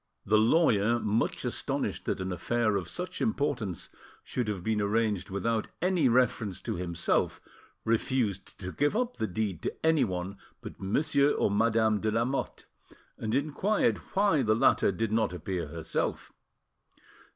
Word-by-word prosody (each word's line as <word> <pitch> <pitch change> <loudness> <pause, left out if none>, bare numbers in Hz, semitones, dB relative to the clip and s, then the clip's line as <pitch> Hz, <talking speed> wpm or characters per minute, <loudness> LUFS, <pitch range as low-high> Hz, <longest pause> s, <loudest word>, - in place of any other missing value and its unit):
The 105 +1 +4
lawyer, 115 -3 +3
much 110 0 0
astonished - - -2
that - - -1
an 95 0 -3
affair 110 +5 0
of 90 -3 -2
such 180 - -4
importance 140 - -1 0.3
should 125 -3 -3
have 100 -4 -3
been 110 0 0
arranged 105 -2 0
without 110 +3 -1
any 180 -6 +2
reference 115 -5 +1
to - - -3
himself, 85 -1 0 0.5
refused 115 -3 0
to 95 0 -4
give 145 - +1
up 250 0 -1
the 110 - -1
deed 95 -2 -2
to - - -4
anyone 100 - +1 0.2
but - - -10
Monsieur 140 +8 +2
or - - +1
Madame 110 0 +2
de 110 - 0
Lamotte, 115 +5 -1 0.5
and 110 +1 -1
inquired 155 +9 +1 0.2
why 195 -7 +3
the 110 -3 +3
latter 110 - +4
did 110 +3 -2
not 110 -4 +1
appear 90 0 -3
herself. 80 -1 -3
110 Hz, 145 wpm, -29 LUFS, 100-130 Hz, 0.5 s, The